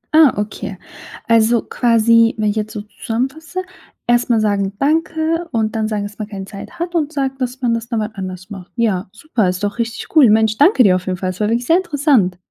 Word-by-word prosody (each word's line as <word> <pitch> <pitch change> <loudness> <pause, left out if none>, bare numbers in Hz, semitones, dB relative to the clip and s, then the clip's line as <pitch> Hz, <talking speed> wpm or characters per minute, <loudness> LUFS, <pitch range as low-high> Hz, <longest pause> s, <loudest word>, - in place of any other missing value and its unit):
Ah, 310 -6 +7
okay. 205 -2 -4 0.5
Also, 230 0 +3
quasi, 230 -1 +3
wenn 215 -1 +1
ich 205 - -6
jetzt 215 0 -2
so 210 -1 -5
zusammenfasse, 270 - -4 0.4
erst 240 +1 +2
mal 230 - +3
sagen 200 -2 0
„danke“ 320 +3 0
und 220 -1 -1
dann 220 -1 0
sagen, 210 -2 -2
dass 205 +1 -8
man 215 - -4
„keine 195 -2 -7
Zeit 200 - -10
hat“ 345 +1 -4
und 310 -3 0
sagt, 270 -2 -3
dass 255 +1 -3
man 235 -1 +2
„das 230 0 -3
dann 230 - -1
mal 215 0 -2
anders 185 -1 -7
macht“. 190 -2 -9
Ja, 205 -6 0
super, 220 - -1
ist 185 +2 -4
doch 205 +3 -2
richtig 230 +7 -4
cool. 275 -8 +7
Mensch, 220 0 +3
danke 290 - +6
dir 185 -3 +5
auf 185 - -9
jeden 185 -1 -1
Fall. 185 +1 -2
Es 185 - -11
war 210 - +1
wirklich 235 +2 0
sehr 330 +7 +4
interessant. 285 - +1
225 Hz, 225 wpm, -18 LUFS, 205-270 Hz, 0.5 s, Ah